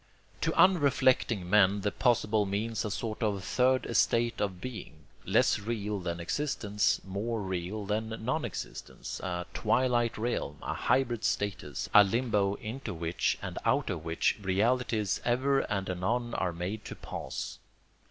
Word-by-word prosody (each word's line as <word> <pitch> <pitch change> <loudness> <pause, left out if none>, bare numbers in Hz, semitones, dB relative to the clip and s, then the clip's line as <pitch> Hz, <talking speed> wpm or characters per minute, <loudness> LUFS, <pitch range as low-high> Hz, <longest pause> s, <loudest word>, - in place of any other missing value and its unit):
To - - +1
unreflecting 130 - +4
men 100 +1 +4
the 105 +1 0
possible 110 -4 +2
means 110 +3 -1
a 105 - -2
sort 110 +2 -4
of 100 -4 0
third 130 +5 +2
estate 120 0 +2
of 95 -3 -1
being, 100 - -8 0.2
less - - +3
real 105 -1 -3
than 85 -2 -3
existence, 105 - 0
more 105 +4 -2
real 95 +2 -3
than 110 +2 -1 0.2
non 140 +6 0
existence, 115 -7 -6
a 90 -1 -3
twilight 120 +1 +1
realm, 105 - -2
a - - -2
hybrid 120 -4 +1
status, 90 -10 -2
a 105 - +10
limbo 105 -2 +1
into 110 -1 -6
which 85 +1 0
and - - -4
out - - +2
of 80 - -4
which 80 +5 0
realities 105 +2 +1
ever 130 +3 +2
and 100 -5 -2
anon 115 +7 -1
are 90 - 0
made 90 +6 -4
to - - -6
pass. - - -6
105 Hz, 145 wpm, -30 LUFS, 95-120 Hz, 0.2 s, a